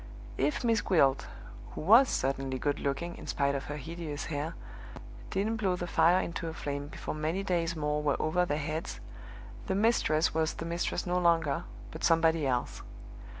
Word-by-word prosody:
If 300 Hz, -, 0 dB
Miss 230 Hz, -2 st, +2 dB
Gwilt 140 Hz, -7 st, +3 dB, 0.5 s
(who -, -, -6 dB
was 230 Hz, -, +7 dB
certainly 135 Hz, 0 st, -1 dB
good 145 Hz, +2 st, -1 dB
looking, 155 Hz, +5 st, -2 dB
in -, -, -10 dB
spite 140 Hz, -1 st, +1 dB
of 140 Hz, 0 st, -3 dB
her 150 Hz, -, -5 dB
hideous 155 Hz, 0 st, -5 dB
hair) 155 Hz, +1 st, -3 dB, 0.7 s
didn't 215 Hz, +4 st, -1 dB
blow 195 Hz, -4 st, +1 dB
the 175 Hz, -, -4 dB
fire 170 Hz, +1 st, +4 dB
into 170 Hz, -1 st, -3 dB
a 160 Hz, -, -5 dB
flame 145 Hz, -1 st, -4 dB
before -, -, -6 dB
many 155 Hz, +5 st, -2 dB
days 170 Hz, -3 st, 0 dB
more 150 Hz, -1 st, -1 dB
were 145 Hz, -2 st, 0 dB
over 170 Hz, +3 st, +1 dB
their 150 Hz, -4 st, -1 dB
heads, 155 Hz, +2 st, -4 dB, 0.7 s
the 190 Hz, -, 0 dB
mistress 195 Hz, -7 st, +2 dB
was 160 Hz, 0 st, 0 dB
the 165 Hz, -, -5 dB
mistress 170 Hz, +1 st, -2 dB
no 180 Hz, 0 st, +1 dB
longer, 165 Hz, -5 st, +2 dB, 0.3 s
but 160 Hz, -, -8 dB
somebody 165 Hz, -2 st, +3 dB
else. 125 Hz, -2 st, -1 dB
160 Hz, 175 wpm, -30 LUFS, 145-175 Hz, 0.7 s, was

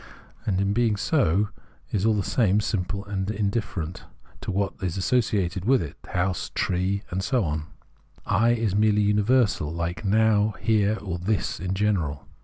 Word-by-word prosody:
and, 95 Hz, -3 st, +1 dB
in 100 Hz, 0 st, +1 dB
being 115 Hz, -1 st, +2 dB
so, 105 Hz, -, +2 dB, 0.4 s
is 105 Hz, +1 st, +1 dB
all 110 Hz, -, +3 dB
the 100 Hz, -, 0 dB
same 105 Hz, -3 st, +2 dB
simple 100 Hz, -1 st, -2 dB
and 100 Hz, -1 st, -3 dB
indifferent 100 Hz, -5 st, -2 dB, 0.4 s
to -, -, -6 dB
what 100 Hz, 0 st, 0 dB
is 95 Hz, -1 st, -2 dB
associated 95 Hz, -4 st, 0 dB
with 130 Hz, +5 st, +4 dB
it, 75 Hz, -7 st, -5 dB
the -, -, -16 dB
house, 90 Hz, 0 st, -1 dB
the -, -, -34 dB
tree, 95 Hz, +2 st, 0 dB
and 95 Hz, +1 st, -1 dB
so 125 Hz, +1 st, +1 dB
on. 75 Hz, -1 st, -2 dB, 0.6 s
I 110 Hz, +4 st, +3 dB
is 110 Hz, -4 st, 0 dB
merely 105 Hz, 0 st, +3 dB
universal, 105 Hz, -, +2 dB
like 85 Hz, +1 st, -3 dB
Now, 105 Hz, 0 st, +3 dB
Here, 110 Hz, -1 st, +2 dB
or 90 Hz, -4 st, -3 dB
This 100 Hz, -1 st, -1 dB
in 95 Hz, +2 st, -2 dB
general. 95 Hz, -9 st, 0 dB
100 Hz, 170 wpm, -25 LUFS, 90-110 Hz, 0.6 s, with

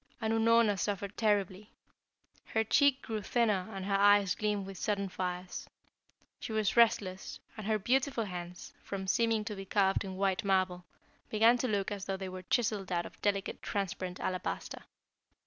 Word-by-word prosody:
And 220 Hz, -1 st, 0 dB
Unorna 225 Hz, -2 st, +4 dB
suffered 200 Hz, +1 st, -2 dB
terribly. 205 Hz, -2 st, 0 dB, 0.8 s
Her 220 Hz, -, 0 dB
cheek 275 Hz, +4 st, +3 dB
grew 220 Hz, -2 st, -3 dB
thinner 210 Hz, -4 st, +1 dB
and 195 Hz, -2 st, -5 dB
her 200 Hz, -, -1 dB
eyes 200 Hz, -1 st, +5 dB
gleamed 210 Hz, -2 st, -1 dB
with 195 Hz, -2 st, -8 dB
sudden 200 Hz, -2 st, -1 dB
fires. 180 Hz, 0 st, -4 dB, 0.7 s
She -, -, -6 dB
was 215 Hz, -2 st, 0 dB
restless, 200 Hz, -5 st, +2 dB, 0.2 s
and 215 Hz, -2 st, -7 dB
her 220 Hz, -1 st, +2 dB
beautiful 255 Hz, +3 st, +1 dB
hands, 180 Hz, -2 st, -7 dB
from 195 Hz, -1 st, -5 dB
seeming 225 Hz, +2 st, +1 dB
to 210 Hz, -, -4 dB
be 195 Hz, 0 st, -7 dB
carved 195 Hz, -1 st, +2 dB
in 190 Hz, -1 st, -6 dB
white 195 Hz, -1 st, +1 dB
marble, 185 Hz, -2 st, +1 dB, 0.4 s
began 225 Hz, +2 st, +5 dB
to 255 Hz, -, 0 dB
look 200 Hz, -3 st, -1 dB
as 200 Hz, -2 st, -4 dB
though 195 Hz, -1 st, -2 dB
they 190 Hz, -1 st, -5 dB
were 185 Hz, 0 st, -7 dB
chiselled 205 Hz, -1 st, 0 dB
out 175 Hz, -1 st, 0 dB
of -, -, -12 dB
delicate 200 Hz, -1 st, -1 dB
transparent 185 Hz, -2 st, -3 dB
alabaster. 185 Hz, -1 st, -4 dB
200 Hz, 165 wpm, -32 LUFS, 190-220 Hz, 0.8 s, eyes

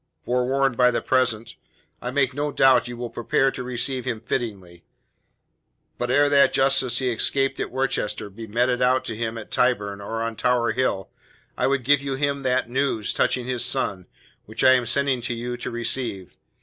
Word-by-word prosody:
Forewarned 130 Hz, +1 st, +1 dB
by 125 Hz, +1 st, +5 dB
the 120 Hz, -, 0 dB
present, 115 Hz, -4 st, 0 dB, 0.4 s
I 125 Hz, -, -4 dB
make 135 Hz, 0 st, +1 dB
no 145 Hz, +2 st, -2 dB
doubt 130 Hz, -4 st, +4 dB
you 120 Hz, 0 st, -7 dB
will 120 Hz, -1 st, -5 dB
prepare 125 Hz, +3 st, +1 dB
to -, -, -7 dB
receive 125 Hz, +1 st, -2 dB
him 120 Hz, -4 st, -2 dB
fittingly. 100 Hz, -7 st, -5 dB, 1.2 s
But 120 Hz, -, -2 dB
ere 145 Hz, +3 st, +4 dB
that 140 Hz, -1 st, +4 dB
justice 135 Hz, -3 st, +3 dB
he 130 Hz, -2 st, 0 dB
escaped 135 Hz, +4 st, 0 dB
at -, -, -2 dB
Worcester 105 Hz, -6 st, -2 dB
be 110 Hz, +3 st, -9 dB
meted 125 Hz, +3 st, 0 dB
out 130 Hz, +1 st, +2 dB
to 110 Hz, -, -4 dB
him 115 Hz, 0 st, -3 dB
at 110 Hz, -, -9 dB
Tyburn 105 Hz, -5 st, 0 dB
or 115 Hz, +3 st, -4 dB
on 115 Hz, -1 st, -4 dB
Tower 125 Hz, -2 st, +1 dB
Hill, 95 Hz, -7 st, -1 dB, 0.4 s
I -, -, +1 dB
would 135 Hz, 0 st, +1 dB
have 145 Hz, -1 st, +5 dB
you 140 Hz, -1 st, -3 dB
give 135 Hz, -, -5 dB
him 140 Hz, -1 st, 0 dB
that 130 Hz, -1 st, 0 dB
news 125 Hz, -4 st, -1 dB
touching 125 Hz, -2 st, 0 dB
his 125 Hz, -2 st, -1 dB
son 100 Hz, -9 st, -1 dB, 0.4 s
which 110 Hz, +3 st, -4 dB
I 130 Hz, -, +7 dB
am 125 Hz, -2 st, +1 dB
sending 135 Hz, +1 st, +1 dB
him 120 Hz, -, -7 dB
to 125 Hz, -, -1 dB
you 120 Hz, +1 st, -4 dB
to 120 Hz, -, -5 dB
receive. 115 Hz, -5 st, -3 dB
125 Hz, 195 wpm, -23 LUFS, 115-135 Hz, 1.2 s, I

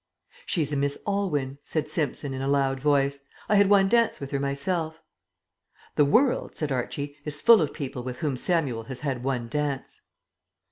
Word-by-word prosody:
"She's 155 Hz, -4 st, 0 dB
a -, -, 0 dB
Miss 140 Hz, 0 st, 0 dB
Aylwyn," 150 Hz, -10 st, -1 dB
said 155 Hz, 0 st, -2 dB
Simpson 150 Hz, -3 st, -2 dB
in 130 Hz, -, -4 dB
a 135 Hz, -, -1 dB
loud 135 Hz, -1 st, +1 dB
voice. 140 Hz, 0 st, +2 dB, 0.3 s
"I -, -, +1 dB
had 200 Hz, -1 st, +5 dB
one 195 Hz, -1 st, +5 dB
dance 235 Hz, +2 st, +2 dB
with 140 Hz, -1 st, -7 dB
her 140 Hz, -, 0 dB
myself." 155 Hz, +4 st, -2 dB, 1.0 s
"The 145 Hz, -, +5 dB
world," 245 Hz, -, +2 dB
said 150 Hz, -2 st, -2 dB
Archie, 140 Hz, +3 st, -3 dB
"is 150 Hz, -1 st, -3 dB
full 230 Hz, -5 st, +8 dB
of 150 Hz, -, 0 dB
people 135 Hz, -4 st, -5 dB
with 125 Hz, 0 st, -5 dB
whom 150 Hz, -5 st, -1 dB
Samuel 130 Hz, -6 st, 0 dB
has 130 Hz, +1 st, -7 dB
had 135 Hz, -5 st, -2 dB
one 125 Hz, -3 st, -1 dB
dance." 145 Hz, 0 st, -3 dB
145 Hz, 180 wpm, -26 LUFS, 135-160 Hz, 1.0 s, full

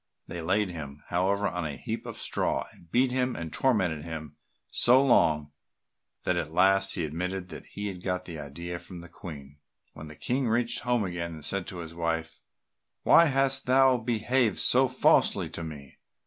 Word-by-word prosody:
They 85 Hz, -, -6 dB
laid 95 Hz, +3 st, 0 dB
him, 75 Hz, -4 st, -8 dB
however, 100 Hz, +3 st, +1 dB
on 90 Hz, -, -3 dB
a 75 Hz, -3 st, -4 dB
heap -, -, -5 dB
of -, -, -7 dB
straw, -, -, -1 dB
and 85 Hz, -, -20 dB
beat 125 Hz, +6 st, +2 dB
him 125 Hz, 0 st, 0 dB
and 85 Hz, -1 st, -6 dB
tormented 95 Hz, -, +1 dB
him 80 Hz, -2 st, -7 dB, 0.4 s
so 125 Hz, +2 st, +5 dB
long 75 Hz, -, +3 dB, 0.7 s
that -, -, +1 dB
at 75 Hz, -, -3 dB
last 95 Hz, +3 st, +3 dB
he 85 Hz, -, -2 dB
admitted 90 Hz, +4 st, -4 dB
that 80 Hz, -, -10 dB
he 105 Hz, -, -6 dB
had 95 Hz, -3 st, -6 dB
got 90 Hz, -1 st, -2 dB
the 85 Hz, -3 st, -7 dB
idea 85 Hz, +5 st, -6 dB
from 90 Hz, -1 st, -9 dB
the 85 Hz, -, -12 dB
Queen. 75 Hz, -5 st, -10 dB, 0.3 s
When 80 Hz, 0 st, -10 dB
the 75 Hz, -, -11 dB
King 125 Hz, -, -1 dB
reached 115 Hz, +1 st, +1 dB
home 120 Hz, -2 st, 0 dB
again, 85 Hz, -3 st, -4 dB
he 80 Hz, -, -10 dB
said 95 Hz, +4 st, 0 dB
to 90 Hz, -2 st, -6 dB
his 80 Hz, -1 st, -9 dB
wife, 85 Hz, -1 st, -3 dB, 0.6 s
"Why 170 Hz, -, +7 dB
hast 135 Hz, -2 st, +2 dB
thou 130 Hz, 0 st, +5 dB
behaved 120 Hz, -1 st, 0 dB
so 130 Hz, +2 st, +5 dB
falsely 130 Hz, +1 st, +2 dB
to 85 Hz, -, -6 dB
me? 75 Hz, -4 st, -9 dB
90 Hz, 185 wpm, -28 LUFS, 80-120 Hz, 0.7 s, Why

